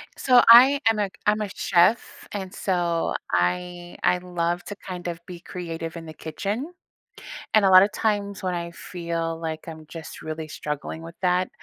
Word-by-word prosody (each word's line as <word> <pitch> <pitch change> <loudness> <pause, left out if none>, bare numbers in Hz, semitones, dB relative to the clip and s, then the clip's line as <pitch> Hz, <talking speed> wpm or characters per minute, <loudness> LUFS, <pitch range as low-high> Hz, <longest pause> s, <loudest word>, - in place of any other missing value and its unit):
So 250 -2 +5
I 260 +5 +9
am 220 - +1
a 205 -2 0 0.2
I'm 210 +1 +2
a 210 - -3
chef, 190 +5 +1
and 190 -2 -5
so 175 -3 0 0.2
I 175 - -1
I 180 - +4
love 175 -1 -2
to 205 - -6
kind 180 -3 -7
of 170 -1 -4
be 180 -1 -9
creative 165 -2 -6
in 165 - -8
the 155 - -9
kitchen. 205 - -4 0.8
And 215 -2 +5
a 190 - +5
lotta 185 +2 +8
times 205 -2 -1
when 185 -1 -1
I 170 -1 -4
feel 170 -1 -4
like 160 0 -5
I'm 160 -1 -9
just 160 0 -9
really 155 0 -5
struggling 150 +1 -5
with 165 +1 -10
that, 180 0 +1
175 Hz, 175 wpm, -24 LUFS, 165-200 Hz, 0.8 s, I